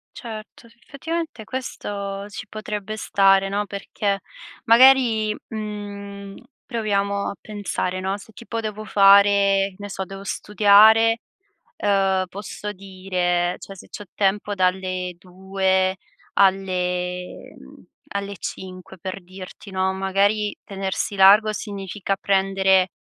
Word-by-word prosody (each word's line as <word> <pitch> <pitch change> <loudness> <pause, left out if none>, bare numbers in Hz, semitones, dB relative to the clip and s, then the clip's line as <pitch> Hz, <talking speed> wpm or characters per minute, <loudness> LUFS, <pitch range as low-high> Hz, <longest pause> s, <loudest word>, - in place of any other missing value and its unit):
Certo. 225 0 -9
Sì, 230 - -24
effettivamente 320 -4 -5
questo 200 -5 -5
ci 205 - -8
potrebbe 215 0 -5
stare, 195 -2 +3
no, 205 +1 -1
perché, 200 0 -3 0.4
magari, 230 -3 +5
mhmm, 200 -2 -7 0.3
proviamo 200 -4 -1
a - - -6
pensare, 200 -3 -3
no, 190 +1 -2
se 220 - -15
tipo 230 +1 -5
devo 215 -1 -5
fare 200 -1 +5
che - - -19
ne 205 0 -7
so, 190 - -4
devo 195 +1 -9
studiare, 215 +3 +5 0.6
uhm, 195 -2 +2
posso 205 +2 -7
dire 185 -2 -1
cioè, 195 - -10
se 190 - -13
c'ho 205 - -8
tempo 205 +1 0
dalle 185 -1 -1
2 190 +1 0 0.4
alle 180 -2 0
mhmm, 65 - -15 0.3
alle 200 -1 -4
5, 185 0 -8
per 185 +2 -6
dirti, 185 +2 -11
no, 190 0 0
magari, 200 +2 +1
tenersi 195 +1 -3
largo 200 +3 +6
significa 200 -2 -4
prendere 190 -1 +2
200 Hz, 115 wpm, -22 LUFS, 190-210 Hz, 0.6 s, largo